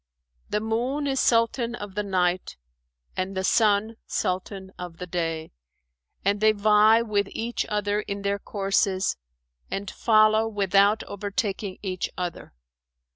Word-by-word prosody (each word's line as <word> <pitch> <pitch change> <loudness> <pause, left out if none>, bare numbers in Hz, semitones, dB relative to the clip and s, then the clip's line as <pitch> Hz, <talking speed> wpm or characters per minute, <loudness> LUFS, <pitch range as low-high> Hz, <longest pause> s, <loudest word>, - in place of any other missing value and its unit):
'[FN#416] - - -36
The 210 - +1
moon 245 +7 -1
is 270 -1 0
Sultan 230 +1 +2
of 205 -4 -8
the 210 - -1
night 185 - 0 0.6
and 190 +1 -3
the 190 - -1
sun 215 +2 +2
Sultan 190 +1 -3
of 175 -2 -7
the 180 - -5
day, 165 -3 -3 0.7
and 200 +1 +1
they 215 0 +5
vie 215 +2 +5
with 205 -3 0
each 235 +1 -3
other 210 0 0
in 200 -1 -5
their 200 0 0
courses 195 -1 0 0.5
and 195 0 -4
follow 215 0 +4
without 200 0 +3
overtaking 200 -1 -3
each 185 -2 -2
other. 175 -2 -5
205 Hz, 135 wpm, -25 LUFS, 190-220 Hz, 0.7 s, they